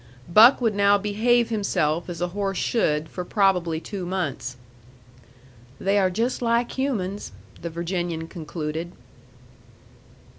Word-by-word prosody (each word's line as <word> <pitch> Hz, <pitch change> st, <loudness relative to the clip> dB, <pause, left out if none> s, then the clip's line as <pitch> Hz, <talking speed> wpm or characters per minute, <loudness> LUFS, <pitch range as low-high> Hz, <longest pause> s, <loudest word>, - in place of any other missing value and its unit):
Buck 220 Hz, +9 st, +7 dB
would 225 Hz, -3 st, +2 dB
now 200 Hz, 0 st, +4 dB
behave 225 Hz, +4 st, +2 dB
himself 175 Hz, -7 st, 0 dB
as 175 Hz, -1 st, -6 dB
a 175 Hz, -, 0 dB
horse 195 Hz, 0 st, -2 dB
should 155 Hz, -9 st, 0 dB
for 180 Hz, -, -6 dB
probably 180 Hz, -4 st, +1 dB
two 190 Hz, +2 st, -6 dB
months. 175 Hz, -8 st, -3 dB, 1.2 s
"They 200 Hz, +1 st, +2 dB
are 190 Hz, -1 st, +3 dB
just 230 Hz, +8 st, -1 dB
like 235 Hz, 0 st, +1 dB
humans," 205 Hz, -, -3 dB, 0.3 s
the 170 Hz, -, -4 dB
Virginian 170 Hz, -1 st, -3 dB
concluded. 160 Hz, 0 st, -5 dB
190 Hz, 120 wpm, -24 LUFS, 170-210 Hz, 1.2 s, Buck